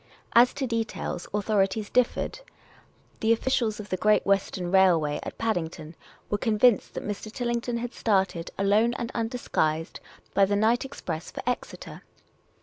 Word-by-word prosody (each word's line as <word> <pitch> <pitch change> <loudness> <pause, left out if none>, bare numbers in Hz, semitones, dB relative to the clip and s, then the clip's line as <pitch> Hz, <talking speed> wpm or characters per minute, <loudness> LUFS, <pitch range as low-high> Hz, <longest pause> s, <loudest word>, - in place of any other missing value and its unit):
As 240 +1 +7
to 275 - -1
details, 225 -6 -3
authorities 205 0 0
differed. 250 - +1 0.8
The 225 - +2
officials 230 -2 0
of 210 -1 -8
the 185 - -1
Great 215 +2 +3
Western 190 -2 0
Railway 170 -6 +4
at - - -7
Paddington 165 -7 -3 0.3
were 205 - -1
convinced 220 +1 +3
that - - -5
Mr. 210 +1 -5
Tillington 240 -1 -2
had 240 0 -4
started, 190 -5 0
alone 210 +4 +3
and 235 +1 -4
undisguised, 180 -9 -1 0.3
by 195 - +5
the 205 +1 0
night 225 +5 +2
express 170 - -6
for - - -6
P^xeter. 250 0 -5
210 Hz, 145 wpm, -26 LUFS, 190-235 Hz, 0.8 s, As